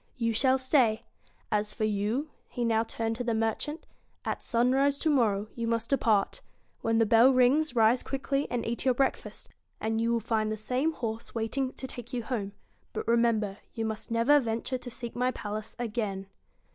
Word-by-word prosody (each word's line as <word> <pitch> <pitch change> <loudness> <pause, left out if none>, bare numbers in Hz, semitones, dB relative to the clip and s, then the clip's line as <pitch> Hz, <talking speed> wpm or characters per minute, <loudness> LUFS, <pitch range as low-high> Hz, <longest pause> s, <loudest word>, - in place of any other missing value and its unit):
* - - -38
You 230 - +2
shall 260 +4 +3
stay. 255 -4 +2 0.5
As 210 0 0
for - - -2
you,' 215 +8 -1 0.2
he 240 -2 -3
now 225 -1 +3
turned 225 0 -3
to 245 - -2
the 235 -2 0
merchant, 225 +8 -2 0.2
' - - -42
at - - -2
sunrise, 265 +4 +2
to 310 - +1
morrow, 215 -7 +2
you 235 -1 -3
must 230 +1 -1
depart. 220 -7 +2 0.4
When 225 0 +1
the 225 - +4
bell 230 +4 +6
rings, 260 +3 +3
rise 230 +2 +4
quickly 275 +1 -2
and 245 -1 -2
eat 235 +1 -2
your 255 -2 +3
breakfast, 270 +1 -2 0.3
and 220 +1 -1
you 230 +1 +1
will 235 - +2
find 220 -1 0
the 215 - -2
same 255 +8 0
horse 230 -4 -5
wait 225 -1 -2
$8 - - -8
ing 265 -1 -1
to - - -7
take 245 0 -9
you 240 -2 -2
home; 215 -5 -3 0.4
but - - -4
remember, 230 -4 +2 0.2
you 225 -1 -2
must 220 0 -4
BEAUTY - - -3
never 285 +6 +5
venture 235 +1 -2
to 245 0 -8
seek 235 -1 -7
my 250 +1 +1
palace 215 -3 -5
again.' 210 -5 -3
230 Hz, 205 wpm, -29 LUFS, 220-255 Hz, 0.5 s, bell